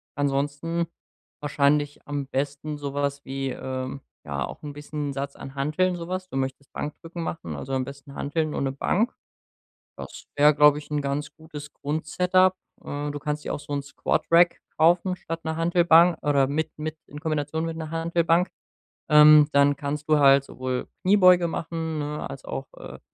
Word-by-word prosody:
ansonsten 145 +4 -1 0.5
wahrscheinlich 145 0 +1
am 145 -2 -3
besten 145 +2 -3
so 140 -1 -5
was 140 0 -2
wie, 135 0 -3
ähm, 130 +1 -5 0.2
ja, 70 -2 -3
auch - - -10
'n 150 - -5
bisschen 145 0 -5
'n - - -4
Satz 140 +1 -4
an 135 - -9
Hanteln, 175 +6 0
so 170 0 -7
was. 185 0 -4
Du 135 - -4
möchtest 135 +1 -4
Bankdrücken 165 +3 -6
machen, 165 - -5
also 135 - -6
am 130 -1 +1
besten 140 +1 -10
Hanteln 155 +1 -2
und - - -2
'ne 135 - 0
Bank. 205 - 0 0.9
Das - - -9
wär, 150 +1 +6
glaub 150 0 +6
ich, 150 - -12
'n 150 -1 -1
ganz 140 +2 -3
gutes 150 -2 -10
Grund-Setup. 180 +5 +1 0.3
Äh, 145 +1 -4
du 145 - -4
kannst 150 +1 -3
dir - - -3
auch - - -3
so'n 145 -1 -4
Squadrack 170 +4 +2 0.2
kaufen 175 +3 +3
statt 165 -1 -6
'ner 160 0 -2
Hantelbank 170 0 +5
oder 140 -2 +3
mit 155 +3 -1
mit 155 +1 -4
in 145 +1 -10
Kombination 155 0 -2
mit 165 - -4
'ner 160 -1 -6
Hantelbank. 170 +2 +1 0.6
Ähm, 150 0 +8
dann 140 0 +4
kannst 150 +1 -4
du 155 -1 +5
halt 140 -1 +6
sowohl 130 -1 -4 0.2
Kniebeuge 185 -3 +6
machen, 160 -1 -3
ne, 150 0 -4
als - - -9
auch, - - -5
äh, - - -9
150 Hz, 175 wpm, -25 LUFS, 140-165 Hz, 0.9 s, Ähm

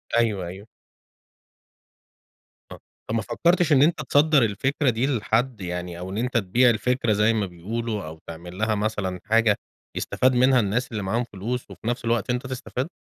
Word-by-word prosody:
أيوه، 105 -6 +1
أيوه. 95 +4 -9 2.0
آه، - - -9 0.3
طب 110 - -1
ما 115 - +1
فكرتش 170 - +1
إن 135 - +5
أنت 155 +1 +3
تصدَّر 145 0 +4
الفكرة 130 +7 +1
دي 120 +3 0
لحد، 115 +1 0
يعني 90 -1 -5
أو 90 +1 -6
إن 95 - -5
أنت 125 +2 0
تبيع 120 +4 +3
الفكرة 120 0 +1
زي 105 +2 +3
ما 110 -3 0
بيقولوا، 105 +4 -4
أو 80 +1 -9
تعمل 85 +2 -9
لها 110 +1 +1
مثلًا 105 -3 -2
حاجة 110 0 +3 0.4
يستفاد 130 0 +1
منها 130 +1 +5
الناس 115 +4 -1
اللي 105 -3 -3
معاهم 115 +6 0
فلوس 120 +3 -5
وفي - - -9
نفس 120 0 -2
الوقت 115 +1 0
أنت 125 +2 -1
تستفاد؟ 130 +1 -4
115 Hz, 170 wpm, -24 LUFS, 100-125 Hz, 2.0 s, إن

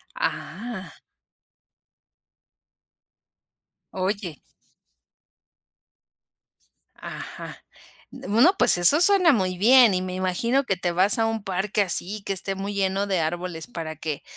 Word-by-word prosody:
Ah. 235 - -5 3.0
Oye 190 -4 -4 2.6
Ajá, - - -9 0.5
d - - -11
bueno, 245 - +4
pues - - +5
eso 280 - +5
suena 365 -3 +5
muy 185 -6 -1
bien. 235 +1 +6
Y 185 - -1
me 185 0 -5
imagino 190 +9 -1
que 195 -6 -1
te 175 -1 -2
vas 195 +7 +2
a 225 - +2
un 225 -2 -3
parque 195 +2 -1
así 195 +2 -1
que - - -2
esté 195 +1 -4
muy 200 +1 -5
lleno 195 0 -1
de 190 -4 -1
árboles 170 +1 -4
para 165 -8 -7
que 155 -1 -5
195 Hz, 115 wpm, -23 LUFS, 180-225 Hz, 3.0 s, bien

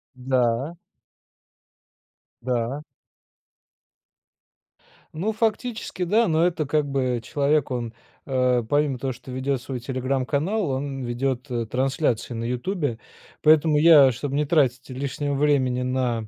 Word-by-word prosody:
Да. 125 +3 0 1.7
Да. 125 +3 -2 2.3
Ну, 200 +8 -1
фактически, 220 -3 -2
да, 220 +6 +3
но 160 0 +2
это 165 -4 -2
как 150 0 0
бы, 130 -3 -1
человек 145 +2 +1
он, 120 -3 -3 0.3
э, 125 -2 +1
помимо 145 0 +1
того, 130 +1 -3
что 125 - -14
ведет 130 0 -2
свой 130 0 -5
"Телеграм"-канал, 135 - -1
он 135 0 -3
ведет 125 +2 -2 0.2
трансляцию 130 -2 -1
на 115 - -3
"Ютубе", 125 - -2 0.5
поэтому 155 0 +5
я 150 -4 +7
чтобы 135 +3 -4
не 150 +1 +1
тратить 135 -5 +1
лишнего 140 +2 -3
времени 135 -3 +2
на 125 -3 -1
135 Hz, 115 wpm, -24 LUFS, 125-150 Hz, 2.3 s, я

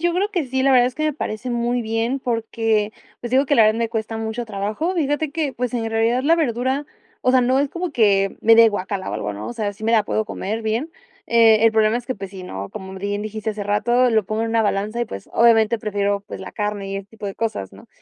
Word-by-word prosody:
yo 345 +1 +1
creo 390 +3 +1
que 350 -9 -1
sí, 260 +1 -1
la 275 - +4
verdad 245 -1 +6
es 250 - -4
que 310 - -2
me 305 - +1
parece 250 -3 -4
muy 240 0 0
bien 225 +4 -1
porque, 225 -3 0 0.3
pues, 240 - -6
digo 265 +2 +4
que 285 - +2
la 230 - +6
verdad 215 +1 +3
me 230 -1 0
cuesta 225 0 -3
mucho 220 +2 -3
trabajo. 215 - -2
Fíjate 295 -2 0
que, 300 -2 -2
pues, 250 0 -3
en 225 -2 -1
realidad 225 +3 +1
la 325 +4 +4
verdura, 265 -1 0 0.3
o 255 - +2
sea, 255 0 +5
no 255 +2 +2
es 285 +1 +1
como 350 +4 -4
que 200 -5 +2
me 225 +1 +6
dé 230 - +8
de 225 - +7
guácala 195 -2 -3
o - - -3
algo, 105 - -3
¿no? 105 +1 -7
O - - -4
sea, 215 -4 -2
sí 210 +2 -10
me 225 - +2
la 220 -3 +4
puedo 220 - -1
comer 220 +1 -4
bien. 225 +9 -1 0.4
Eh, 225 -1 +5
el 225 - +5
problema 220 +1 +3
es 240 0 -6
que, 255 - -2
pues, 195 -2 -8
sí, 190 -2 -9
¿no? 100 - -6
Como 190 -2 -8
b - - -7
bien 205 +1 -2
dijiste 215 0 -4
hace 210 -1 -5
rato, 240 +5 +2
lo 220 -2 +2
pongo 215 +3 -2
en 230 - -1
una 225 0 +2
balanza 210 +3 -1
y, - - +1
pues, - - -8
obviamente 230 -1 +4
prefiero, 205 -1 -1
pues, - - -8
la 190 - -8
carne 205 -1 -3
y 195 - -3
ese 195 0 -7
tipo 215 -1 -8
de 195 - -5
cosas, 215 - -3
¿no? - - -15
225 Hz, 275 wpm, -21 LUFS, 210-250 Hz, 0.4 s, dé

